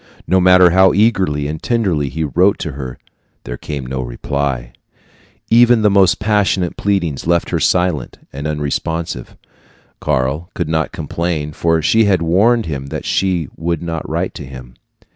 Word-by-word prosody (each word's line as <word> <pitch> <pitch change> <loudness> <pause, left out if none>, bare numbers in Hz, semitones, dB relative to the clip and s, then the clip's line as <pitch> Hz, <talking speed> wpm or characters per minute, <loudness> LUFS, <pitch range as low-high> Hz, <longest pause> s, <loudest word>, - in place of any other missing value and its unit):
No 95 - +2
matter 90 -1 +6
how 95 0 +5
eagerly 95 -9 +2
and 75 +1 -5
tenderly 95 - 0
he 80 +3 -3
wrote 90 +6 +2
to 80 - -4
her, 65 -2 -7 0.5
there - - -6
came 70 0 -6
no 65 +1 -4
reply. 65 0 -3 0.8
Even 120 -1 +5
the 105 - +4
most 95 -3 +4
passionate 105 -4 0
pleadings 90 -9 -1
left 85 0 +1
her - - 0
silent 90 -7 0 0.2
and 70 +3 -4
unresponsive. 75 -1 -3 0.6
Karl 70 +7 -1
could 85 - -2
not 80 0 0
complain, 80 -3 -3
for 80 0 0
she 110 +6 +3
had 95 -4 +2
warned 105 +7 +3
him 70 -3 -5
that - - -6
she 90 -5 0
would 85 0 -3
not 80 -2 -4
write - - -2
to - - -8
him. 65 -2 -11
85 Hz, 160 wpm, -17 LUFS, 70-95 Hz, 0.8 s, matter